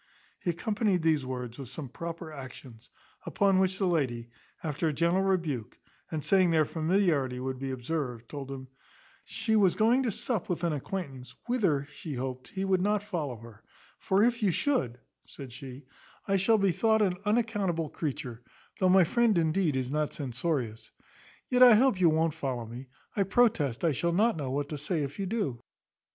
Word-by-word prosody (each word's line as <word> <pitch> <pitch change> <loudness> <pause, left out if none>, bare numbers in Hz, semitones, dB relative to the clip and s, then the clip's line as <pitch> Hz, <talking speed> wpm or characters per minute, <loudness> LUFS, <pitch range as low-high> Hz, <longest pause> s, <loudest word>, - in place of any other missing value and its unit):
He - - -3
accompanied 200 +1 0
these 155 -5 +2
words 125 -1 -5
with 135 -3 -7
some 140 +1 -7
proper 165 +3 -7
actions; 130 -3 -11 0.3
upon 195 -2 +2
which 190 0 +1
the 195 - 0
lady, 125 -9 -1 0.3
after 160 +1 -1
a 155 - 0
gentle 170 +5 +2
rebuke, 165 - -1 0.3
and 155 -3 -3
saying 190 -2 +4
their 160 -2 +3
familiarity 155 -6 +1
would 130 0 -4
be 135 0 -3
observed, 125 -2 -4
told 140 0 -7
him, 130 -1 -7 0.6
"She 220 -2 -1
was 195 -4 +4
going 235 +4 +4
to 245 -4 0
sup 220 -1 -3
with 175 -1 -2
an 170 -2 +1
acquaintance, 140 -4 -5
whither 185 - +1
she 150 0 -7
hoped 130 0 -5
he 195 0 -4
would 190 -1 +2
not 205 +1 +1
follow 160 -11 -3
her; 115 -1 -13 0.4
for 195 +2 +2
if 235 0 +2
you 205 - +3
should," 165 - 0 0.3
said 135 -4 -10
she, 130 +1 -10 0.4
"I 195 - +2
shall 220 +4 +4
be 195 -2 +3
thought 220 +3 +3
an 180 -3 +1
unaccountable 210 -7 0
creature, 125 -6 -4 0.4
though 185 - +3
my 190 0 +7
friend 230 +2 +2
indeed 160 -1 +1
is 130 0 -2
not 150 0 -1
censorious: 130 -4 -3 0.6
yet 250 -1 +1
I 245 -3 +10
hope 230 -4 +3
you 170 - +6
won't 160 0 +2
follow 125 -5 -3
me; 120 +4 -9 0.3
I 205 - +1
protest 185 - +2
I 165 - +3
shall 170 +5 0
not 220 +6 +3
know 145 -5 -4
what 140 +2 -2
to 150 - -4
say 150 +1 -1
if 140 +4 -6
you 195 - -1
do." 185 - -2
160 Hz, 185 wpm, -29 LUFS, 135-195 Hz, 0.6 s, I